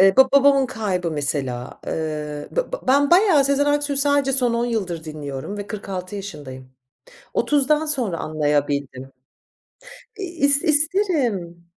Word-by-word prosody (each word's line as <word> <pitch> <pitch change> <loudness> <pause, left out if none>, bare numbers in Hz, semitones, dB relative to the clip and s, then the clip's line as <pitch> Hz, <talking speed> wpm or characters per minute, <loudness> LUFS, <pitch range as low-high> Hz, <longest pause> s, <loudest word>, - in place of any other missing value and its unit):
Eee, 195 0 +6
ba 265 0 +7
babamın 280 -1 +5
kaybı 195 -8 -2
mesela. 135 -4 -3
Iıı, 150 -2 -4
b - - -1
b - - 0
ben 280 +2 +4
bayağı 350 -6 +5
Sezen 280 +1 +2
Aksu'yu 290 -1 0
sadece 280 -1 +2
son 250 -3 +2
10 235 +1 0
yıldır 185 -9 -3
dinliyorum 150 +3 -6
ve 205 - -5
46 195 -2 -6
yaşındayım, 135 -10 -9 0.6
30'dan 295 +2 +2
sonra 250 - -1
anlayabildim. 145 -4 -1 1.1
İ - - -5
is 285 -5 +1
isterim. 290 - 0
215 Hz, 130 wpm, -22 LUFS, -, 1.1 s, ba